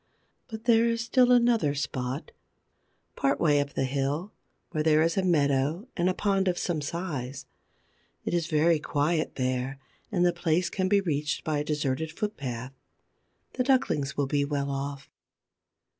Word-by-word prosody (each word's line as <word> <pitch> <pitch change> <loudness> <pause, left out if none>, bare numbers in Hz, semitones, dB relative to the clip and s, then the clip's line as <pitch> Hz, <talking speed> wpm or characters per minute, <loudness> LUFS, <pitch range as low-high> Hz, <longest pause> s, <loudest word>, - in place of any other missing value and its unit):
But 220 -2 -8
there 230 -1 +4
is 230 -1 0
still 250 +1 +4
another 235 -12 +4
spot, 130 -1 -3 0.8
part 135 - +1
way 150 -3 +4
up 145 0 -5
the - - +1
hill, 140 +8 -2 0.4
where 155 - -1
there 155 0 +4
is 165 0 +1
a 195 - +2
meadow 150 - +1
and 175 0 +2
a - - +1
pond 195 -2 +1
of 180 -1 +1
some 165 -4 -1
size. 145 -5 -4 0.8
It - - -2
is 170 -2 0
very 160 +1 +3
quiet 155 +2 0
there, 130 +1 -1 0.3
and 180 -3 +2
the 175 - +3
place 170 +1 0
can 185 -1 0
be 200 0 +4
reached 150 -4 -1
by 155 -2 0
a - - -1
deserted 150 0 -1
footpath. 135 - -4 0.8
The 255 - 0
ducklings 250 - +1
will 145 - +2
be 145 +1 +1
well 140 -1 -2
off. 140 0 -4
155 Hz, 160 wpm, -27 LUFS, 140-185 Hz, 0.8 s, there